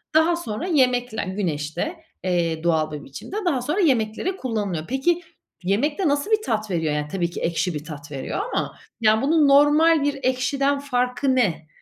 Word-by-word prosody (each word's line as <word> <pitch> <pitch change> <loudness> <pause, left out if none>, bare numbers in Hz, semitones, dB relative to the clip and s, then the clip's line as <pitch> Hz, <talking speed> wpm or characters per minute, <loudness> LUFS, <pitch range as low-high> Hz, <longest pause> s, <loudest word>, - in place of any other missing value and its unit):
Daha 330 +2 +5
sonra 325 0 -4
yemekle 250 -7 +2
Güneşte, 165 - -2 0.3
eee, 170 -3 0
doğal 160 -2 +1
bir 150 -1 -6
biçimde, 140 - -9
daha 275 -8 +1
sonra 305 +10 -1
yemeklere 260 - +1
kullanılıyor. 205 - -3
Peki, 300 +8 +1 0.4
yemekte 290 - +1
nasıl 285 +9 0
bir 430 0 +4
tat 215 -4 -1
veriyor? 160 -3 0
Yani, 150 0 -2
tabii 175 -3 -1
ki - - -7
ekşi 170 +1 0
bir 150 0 -5
tat 145 -2 -9
veriyor 140 - -4
ama, - - -2 0.2
yani, 220 0 +4
bunun 300 +1 +4
normal 295 +2 +5
bir 285 -1 -1
ekşiden 275 +2 +1
farkı 260 0 0
ne? 170 -10 +1
245 Hz, 170 wpm, -23 LUFS, -, 0.4 s, Daha